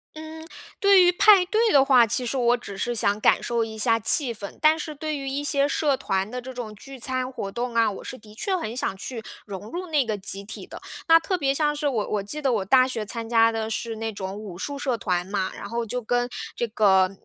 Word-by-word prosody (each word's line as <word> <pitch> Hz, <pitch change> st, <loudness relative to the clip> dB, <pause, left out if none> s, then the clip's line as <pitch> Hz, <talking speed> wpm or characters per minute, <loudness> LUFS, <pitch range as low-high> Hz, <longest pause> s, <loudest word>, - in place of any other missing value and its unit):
嗯， 315 Hz, +1 st, -9 dB, 0.4 s
对 395 Hz, -2 st, +6 dB
于 355 Hz, -, +5 dB
派 380 Hz, +1 st, +6 dB
对 440 Hz, +4 st, +2 dB
的 275 Hz, -, +6 dB
话， 250 Hz, -4 st, +5 dB
其 245 Hz, +3 st, -1 dB
实 260 Hz, +3 st, -2 dB
我 240 Hz, 0 st, +3 dB
只 200 Hz, -4 st, -9 dB
是 240 Hz, +4 st, -2 dB
想 205 Hz, -2 st, +2 dB
感 -, -, +4 dB
受 235 Hz, -1 st, 0 dB
一 220 Hz, -1 st, -7 dB
下 225 Hz, +1 st, +2 dB
气 240 Hz, +3 st, +2 dB
氛。 205 Hz, -2 st, -9 dB
但 310 Hz, +1 st, +5 dB
是 310 Hz, -1 st, -6 dB
对 310 Hz, +1 st, -3 dB
于 275 Hz, -1 st, -5 dB
一 280 Hz, +2 st, -3 dB
些 285 Hz, -1 st, +2 dB
社 290 Hz, -1 st, +1 dB
团 195 Hz, -2 st, -1 dB
的 250 Hz, -, -5 dB
这 260 Hz, +1 st, -8 dB
种 240 Hz, -4 st, -6 dB
聚 270 Hz, +6 st, -12 dB
餐 255 Hz, +1 st, -1 dB
活 195 Hz, -6 st, -5 dB
动 240 Hz, +2 st, -4 dB
啊， 230 Hz, -1 st, +4 dB
我 195 Hz, -, -9 dB
是 255 Hz, -, -7 dB
的 215 Hz, -2 st, -16 dB
确 380 Hz, -, -2 dB
很 225 Hz, -9 st, -5 dB
想 245 Hz, -, -2 dB
去 230 Hz, +4 st, -6 dB, 0.2 s
融 200 Hz, 0 st, -8 dB
入 360 Hz, +5 st, -5 dB
那 300 Hz, -4 st, +2 dB
个 215 Hz, -2 st, -2 dB
集 195 Hz, 0 st, -6 dB
体 215 Hz, -, -9 dB
的。 -, -, -11 dB, 0.3 s
那 330 Hz, 0 st, +7 dB
特 360 Hz, +3 st, -2 dB
别 275 Hz, -4 st, +1 dB
像 295 Hz, +1 st, 0 dB
是 295 Hz, 0 st, -1 dB
我 230 Hz, -7 st, -1 dB
我 210 Hz, -2 st, -1 dB
记 295 Hz, +10 st, -5 dB
得 270 Hz, -3 st, +1 dB
我 205 Hz, -4 st, -1 dB
大 255 Hz, +5 st, +5 dB
学 225 Hz, -4 st, -3 dB
参 225 Hz, +2 st, -4 dB
加 230 Hz, -1 st, +4 dB
的 220 Hz, -1 st, -3 dB
是 225 Hz, +1 st, -3 dB
那 225 Hz, 0 st, -3 dB
种 190 Hz, -1 st, -5 dB
武 205 Hz, -4 st, -8 dB
术 285 Hz, +9 st, -5 dB
社 260 Hz, -4 st, -1 dB
团 180 Hz, -4 st, -1 dB
嘛， 195 Hz, -1 st, -2 dB
然 -, -, -8 dB
后 235 Hz, +1 st, -2 dB
就 250 Hz, +3 st, -4 dB
跟 245 Hz, +1 st, 0 dB, 0.3 s
这 235 Hz, -, -1 dB
个 195 Hz, -4 st, +3 dB
240 Hz, 270 characters per minute, -24 LUFS, 215-285 Hz, 0.4 s, 那